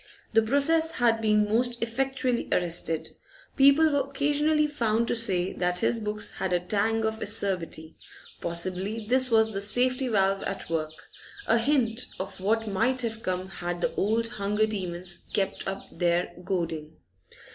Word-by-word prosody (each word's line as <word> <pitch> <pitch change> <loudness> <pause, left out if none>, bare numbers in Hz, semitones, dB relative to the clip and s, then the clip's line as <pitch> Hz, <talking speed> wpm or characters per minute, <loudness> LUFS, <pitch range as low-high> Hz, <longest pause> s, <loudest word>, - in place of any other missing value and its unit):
The 225 - +5
process 320 +7 +2
had 230 -2 +2
been 210 -1 +3
most 240 +3 +2
effectually 250 +1 -1
arrested. 170 -2 +1 0.5
People 280 +3 +5
were 280 -1 0
occasionally 295 +2 +1
found 235 -6 0
to - - +1
say 190 -6 +3
that 180 0 0
his 230 +5 +1
books 210 -1 -3
had 190 -1 -3
a 175 - +3
tang 215 +5 0
of 220 0 -2
acerbity; 185 -6 -1 0.5
possibly 185 +6 -2
this 255 +3 +3
was 220 -1 +3
the 195 - -2
safety 255 +5 +1
valve 195 -3 +1
at 195 -4 -5
work, 155 0 -3 0.4
a 230 - +3
hint 250 -2 +1
of 190 - -6
what 225 +4 0
might 235 +6 0
have 225 -1 -4
come 185 -1 -3
had 175 -2 -5
the - - 0
old 225 +3 +1
hunger 210 -2 0
demons 180 -4 -4
kept 195 -2 -2
up 195 0 -4
their 175 0 0
goading. 165 -4 -3
215 Hz, 155 wpm, -27 LUFS, 185-245 Hz, 0.5 s, The